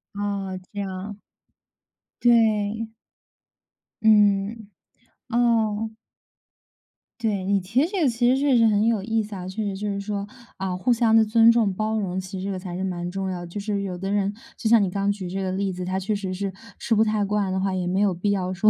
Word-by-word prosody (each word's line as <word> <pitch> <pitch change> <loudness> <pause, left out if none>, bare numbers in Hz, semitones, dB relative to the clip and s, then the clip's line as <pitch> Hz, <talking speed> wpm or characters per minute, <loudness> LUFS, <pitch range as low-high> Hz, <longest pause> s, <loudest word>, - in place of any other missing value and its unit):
哦， 200 -2 -3
这 205 - -6
样。 195 +1 -5 1.0
对。 240 - +4 1.7
嗯， 210 0 +3 0.6
哦。 225 -2 +1 1.3
对， 205 -5 -1
你 200 0 +2
提 195 +8 0
的 320 - +2
这 390 -2 -2
个 270 - +4
其 240 +1 +2
实 260 - +4
确 275 -2 +3
实 230 - +5
很 210 0 +3
有 225 -3 +2
意 225 +2 0
思 210 0 -8
啊， 180 -1 -6
确 190 +4 -4
实 200 -2 -3
就 210 +1 -3
是 200 -1 -2
说 200 0 -4 0.3
啊 190 -1 -2
互 185 +7 0
相 230 -1 +3
的 225 - +7
尊 225 +1 +5
重 230 -4 +3
包 215 +3 -1
容， 190 -3 -2
其 190 +1 -6
实 185 - -5
这 200 - -2
个 185 - -4
才 180 -2 -6
是 185 - -3
蛮 175 -2 -3
重 190 0 -3
要 180 - -4
的。 175 - -7
就 170 - -8
是 205 -1 -2
有 185 -2 -4
的 195 +2 -3
人 200 0 +1 0.2
就 220 - -1
像 230 -2 +6
你 195 - 0
刚 200 +1 0
举 195 -3 -5
这 195 +2 -3
个 190 -1 -2
例 195 0 -1
子， 180 0 -5
她 185 +1 -2
确 195 +3 -1
实 195 -2 -3
是 195 +1 -3 0.3
吃 230 - -1
不 220 +1 +4
太 215 -1 +1
惯 200 -1 0
的 190 - 0
话， 195 0 0
也 180 -1 -2
没 190 +2 +1
有 200 -2 +3
必 190 +4 -1
要 185 -2 -1
说 195 +4 +4
200 Hz, 240 characters per minute, -24 LUFS, 190-220 Hz, 1.7 s, 的